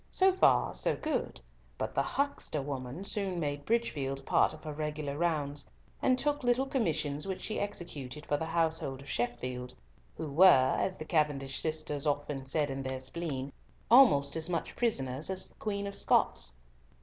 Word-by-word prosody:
So 380 0 +4
far 375 - +4
so - - +1
good; 310 0 -2 0.4
but - - -3
the - - +2
huckster 280 - -1
woman 135 +3 -5
soon 195 -3 -2
made 145 -2 -3
Bridgefield 140 -13 -1
part - - +4
of 155 - -10
her 155 - -5
regular 150 -1 -3
rounds, 150 -3 -1 0.3
and 255 -1 +3
took 290 +1 0
little 245 +2 +3
commissions 155 - -1
which 190 -1 -4
she 215 - -1
executed 150 -8 -5
for 145 - +1
the 160 - -2
household 160 -5 0
of 140 - -13
Sheffield, 125 +1 -3 0.4
who 160 - -4
were, 140 -3 +6
as 185 - -1
the 155 - -6
Cavendish 145 -5 0
sisters 155 -2 -2
often 145 -2 -1
said 145 +1 0
in 135 0 -3
their 130 0 -3
spleen, 135 -1 -4 0.4
almost 155 - +6
as 160 +1 -2
much 170 -2 -2
prisoners 140 - -1
as 190 0 -1
the - - -24
Queen 200 -2 -2
of 200 - -4
Scots. - - +2
150 Hz, 170 wpm, -31 LUFS, 140-190 Hz, 0.4 s, were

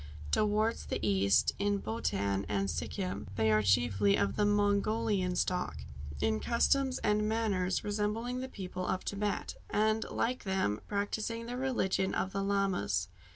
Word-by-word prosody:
Towards 215 - +1
the - - -1
east 100 0 +3
in 205 0 +1
Bhotan 100 - -1
and 100 -1 0
Sikhim 80 +5 -4
they 110 0 +2
are 105 0 +4
chiefly 100 -1 +3
of 100 -1 0
the 205 - +2
Mongolian 205 -1 +1
stock, 130 - -1 0.4
in 75 0 +1
customs 260 - +2
and 210 0 +2
manners 200 -5 0
resembling 210 +4 -1
the 260 0 -5
people 185 -4 -5
of 185 - -1
Thibet, 205 0 -2
and, 215 +1 +2
like 250 +2 -1
them, 190 - 0
practising 220 +3 -2
the 245 +1 -5
religion 240 -7 0
of 190 - -1
the 195 - -1
Lamas. 195 - 0
195 Hz, 145 wpm, -32 LUFS, -, 0.4 s, are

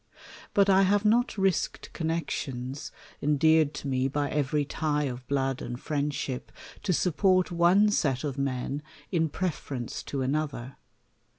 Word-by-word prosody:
But 200 -1 +5
I 195 -1 +6
have 200 +2 +3
not 235 +2 +3
risked 190 -5 0
connexions, 145 -4 -3 0.3
en 150 0 +2
deared 160 0 +4
to 145 - -5
me 130 -1 +1
by 145 +1 -1
every 145 0 +1
tie 150 0 -1
of 125 -2 -5
blood 135 -2 0
and 120 0 -5
friendship, 140 -3 -3 0.3
to 195 - 0
support 185 +2 +2
one 175 +5 +5
set 135 -10 +1
of 140 -3 -2
men 140 +1 -2 0.3
in 165 -3 +1
preference 145 -8 -3
to 135 -2 -2
another. 135 -2 -2
150 Hz, 140 wpm, -28 LUFS, 135-175 Hz, 0.3 s, I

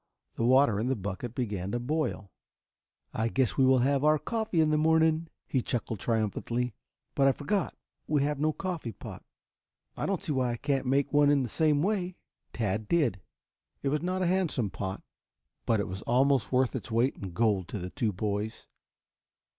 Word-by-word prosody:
The - - -3
water 130 -3 +4
in 115 - -1
the 135 - +1
bucket 105 +3 -5
began 100 -7 -2
to 120 - 0
boil. 120 - -2 0.8
"I 110 +1 0
guess 125 0 +1
we 135 - +4
will 130 0 +5
have 140 0 +2
our 155 0 +5
coffee 220 +1 -2
in 155 -1 +4
the - - +3
morning," 160 +1 +3 0.2
he 130 - 0
chuckled 115 -3 -3
triumphantly. 115 +2 -1 0.4
"But 135 - +3
I - - +6
forgot; 190 +6 -1 0.3
we 145 -2 +2
have 145 -1 -1
no 155 +1 +2
coffee 165 - -4
pot. - - -9 0.7
I - - -2
don't 195 -1 0
see 175 - -2
why 130 -3 +1
I - - -4
can't 135 0 -1
make 140 +2 +1
one 145 0 +5
in 145 -2 +3
the 120 - -4
same 150 +3 +2
way." 185 -3 -1 0.4
Tad 105 -1 -2
did. 135 - +1 0.6
It 140 - +1
was 150 +2 0
not 185 +2 -1
a - - +2
handsome 170 - 0
pot, 95 -1 -5 0.6
but 115 -2 +3
it 100 - -1
was 95 +2 -6
almost 135 +1 +2
worth 130 -1 +2
its - - -5
weight 120 +4 +2
in 95 - -6
gold 105 -4 +1
to 105 - -5
the 90 -1 -6
two 110 -3 0
boys. 105 +2 -3
130 Hz, 190 wpm, -29 LUFS, 110-155 Hz, 0.8 s, I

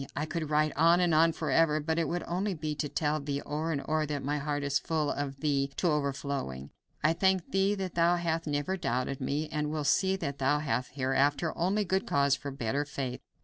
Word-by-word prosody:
I 145 +3 -1
could 155 -1 -4
write 155 0 +2
on 165 +3 +5
and 175 -2 +2
on 165 +1 +5
forever, 160 -1 +2
but 160 +2 -1
it 165 - +1
would 175 +4 -2
be - - -9
only 190 +3 -1
to 150 -1 -3
tell 150 +1 0
thee 140 -1 -3
o'er 155 +3 -2
and 145 -3 -1
o'er 155 0 +1
that 145 -2 -3
my 145 +2 -1
heart 145 0 -2
is 140 0 +1
full 155 -3 -1
of 140 -1 -4
thee 140 -2 +1
to 175 - +1
overflowing. 140 - -2 0.3
I 155 +2 +4
thank 190 +1 +1
thee 195 +2 +2
that 190 -3 -4
thou 170 +1 +3
hast 165 -1 -1
never 145 +6 -1
doubted 135 -4 -2
me, 145 +4 -1
and 150 -1 -1
will 155 0 -2
see 190 +6 +3
that 140 -7 -4
thou 135 +2 +3
hast 135 -4 -2
hereafter 140 +4 +1
only 195 +5 +1
good 190 +2 0
cause 140 -1 +3
for 145 - -6
better 135 +1 -1
faith. 135 -3 -5
150 Hz, 220 wpm, -30 LUFS, 140-165 Hz, 0.3 s, on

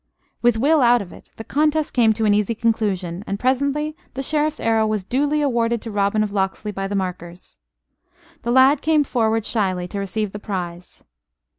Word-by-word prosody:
With 240 -2 +3
Will 295 +6 +3
out 240 -2 +4
of 180 - -13
it, - - -15
the 225 - -7
contest 305 +4 0
came 230 -3 +4
to 220 0 -1
an 205 - +4
easy 210 +2 +1
conclusion; 200 -6 -1
and 200 - -3
presently 280 +4 0 0.2
the 270 - -3
Sheriff's 305 +2 0
arrow 225 -1 +2
was 215 -2 -1
duly 290 +8 0
awarded 235 -3 +1
to 225 - -6
Robin 205 +1 +1
of 210 - -3
Locksley 195 +1 -2
by 195 -1 -4
the 200 - -3
markers. 180 -2 -6 0.8
The 235 - -4
lad 260 +3 +5
came 310 -1 +3
forward 225 -4 0
shyly 185 -5 -1
to 200 - -4
receive 200 +1 -3
the 210 - -7
prize. 180 -4 -6
220 Hz, 185 wpm, -21 LUFS, 200-260 Hz, 0.8 s, lad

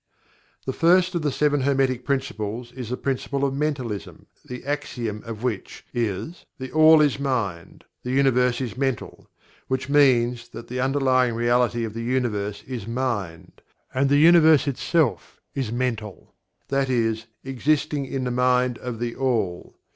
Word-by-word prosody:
The 130 - -2
first 180 +4 +3
of 170 - -1
the 150 -2 0
Seven 145 +1 +1
Hermetic 135 -2 +1
Principles 120 -3 -3
is 125 -3 -7
the 125 - -2
Principle 140 +1 -1
of 135 - -1
Mentalism, 135 -8 -3 0.2
the 125 0 -8
axiom 120 -7 -3
of 115 0 -7
which 115 -6 -4
is 120 - -3
"THE 130 -2 -7
ALL 155 0 +7
is 145 -2 +2
Mind; 115 -11 -3 0.2
the 125 - -6
Universe 125 -2 +2
is 120 -4 -4
Mental," 130 -3 -3 0.4
which 130 0 -2
means 120 -4 +3
that 115 - -10
the 125 +1 -4
Underlying 130 -3 +2
Reality 120 0 +1
of 110 -2 -4
the 115 - -5
Universe 115 -5 -2
is 120 -5 -6
Mind; 115 -9 -4 0.3
and 135 +2 +2
the 145 - +4
Universe 160 -2 +6
itself 140 0 0
is 130 -5 -3
Mental 115 -5 -4 0.4
that 135 -1 0
is, 115 -2 0 0.2
"existing 140 +2 0
in 135 -1 -3
the 125 - -2
Mind 125 0 +2
of 125 -2 -5
THE 120 0 -3
ALL." 110 -10 -1
125 Hz, 155 wpm, -24 LUFS, 115-140 Hz, 0.4 s, ALL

